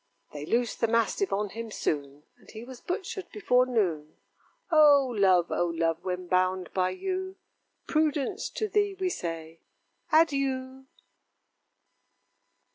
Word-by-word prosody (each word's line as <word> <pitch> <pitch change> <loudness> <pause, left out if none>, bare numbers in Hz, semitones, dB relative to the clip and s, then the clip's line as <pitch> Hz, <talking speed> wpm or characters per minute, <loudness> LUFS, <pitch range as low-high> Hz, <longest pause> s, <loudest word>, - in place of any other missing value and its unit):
They 150 0 -7
loosed 235 0 0
the 230 - +3
mastiff 230 - +1
on 205 +1 -1
him 230 +3 -6
soon, 145 -7 -3 0.2
And - - -20
he 220 - -9
was 250 0 -11
butchered 370 +1 -4
before 255 -11 +2
noon. 175 -11 -1 0.6
O 290 -5 +6
Love! 185 -4 +3
O 175 - +1
Love! 165 0 -1
when 180 -1 -3
bound 185 0 0
by 185 -1 +1
you, 375 - -4 0.5
Prudence, 305 -3 0
to 435 - -3
thee 410 -1 +1
we 375 -1 0
say, 165 - -5 0.5
Adieu! 265 -4 +1
230 Hz, 125 wpm, -28 LUFS, 180-300 Hz, 0.6 s, O